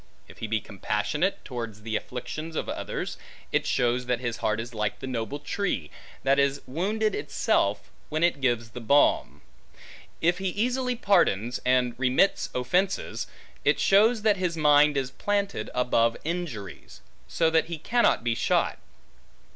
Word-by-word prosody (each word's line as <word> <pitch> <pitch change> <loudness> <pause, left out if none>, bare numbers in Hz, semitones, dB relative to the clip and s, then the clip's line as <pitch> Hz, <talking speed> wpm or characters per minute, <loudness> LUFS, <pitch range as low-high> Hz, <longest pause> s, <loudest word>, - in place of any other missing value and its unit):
If - - -15
he 110 - -4
be 110 0 0
compassionate 105 - -2
towards 115 -4 -6
the 110 0 -3
afflictions 140 +8 -5
of - - -2
others, - - -4 0.3
it - - +1
shows 125 0 +1
that 125 -1 +1
his 120 -1 -3
heart 110 0 0
is 120 +2 -6
like 105 -2 -2
the - - -7
noble 130 +1 -3
tree, 150 - -3 0.3
that 135 +1 +3
is 140 0 +2
wounded 210 +10 -1
itself, 425 - 0 0.2
when 155 +2 -1
it 170 -5 +2
gives 120 -4 0
the 125 - -8
balm. 140 +5 +2 0.8
If 175 +2 +2
he 190 -1 -1
easily 250 +6 0
pardons, 125 - +2
and 125 -1 +2
remits 130 +9 +2
offences, 180 +11 0 0.4
it - - +3
shows 215 +3 +4
that 210 -2 +4
his 180 -3 -1
mind 150 -1 +5
is 130 -2 -1
planted 200 -1 -2
above 115 -2 +2
injuries; 155 - -5 0.3
so 165 -1 +1
that 160 0 +3
he 170 -1 -5
cannot 240 - +2
be 120 -1 +1
shot. - - +1
140 Hz, 155 wpm, -27 LUFS, 120-180 Hz, 0.8 s, mind